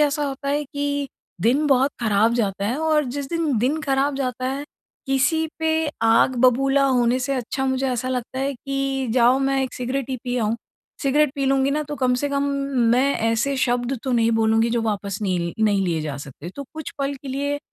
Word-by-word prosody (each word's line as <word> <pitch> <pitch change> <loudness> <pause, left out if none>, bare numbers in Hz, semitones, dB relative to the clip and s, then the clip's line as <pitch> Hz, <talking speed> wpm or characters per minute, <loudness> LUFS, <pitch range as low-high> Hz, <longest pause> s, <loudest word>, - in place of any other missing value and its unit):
ऐसा 295 0 +2
होता 280 0 -5
है 290 +1 0
कि 285 0 -2 0.3
दिन 255 - +2
बहुत 270 0 +3
खराब 220 0 +3
जाता 200 -4 -1
है 235 +5 -1
और 310 -1 +2
जिस 270 +2 -4
दिन, 320 -6 0
दिन 275 +8 +1
खराब 275 0 +1
जाता 255 -1 -2
है, 270 +2 -3 0.4
किसी 285 +4 +2
पे 320 0 +1 0.3
आग 225 +3 +4
बबूला 270 +2 +4
होने 250 -1 +2
से 260 +2 -2
अच्छा 260 +1 -2
मुझे 265 0 0
ऐसा 255 0 -2
लगता 255 0 -3
है 275 +1 0
कि 275 +1 -2
जाओ 245 +1 +4
मैं 270 0 +1
एक 260 - -3
सिगरेट 255 +1 -3
ही 260 - -1
पी 250 0 -2
आऊँ। 225 0 0 0.5
सिगरेट 290 +1 +3
पी 280 -2 -1
लूँगी 270 0 +2
ना, 300 +2 0
तो 295 0 -6
कम 255 -2 +2
से 285 +3 -1
कम 280 0 0 0.5
मैं 270 +3 +3
ऐसे 230 +5 0
शब्द 245 0 0
तो 260 - -2
नहीं 230 -1 +3
बोलूँगी 225 +1 +2
जो 235 0 0
वापस 200 -2 -2
नहीं 185 -3 0
ल - - -6
नहीं 200 -2 +2
लिए 170 -3 0
जा 150 -3 -4
सकते। 140 +4 -9
तो 280 - -5
कुछ 315 -2 -6
पल 275 +1 -1
के 275 0 -10
लिए 285 +2 -2
265 Hz, 210 wpm, -22 LUFS, 235-280 Hz, 0.5 s, आग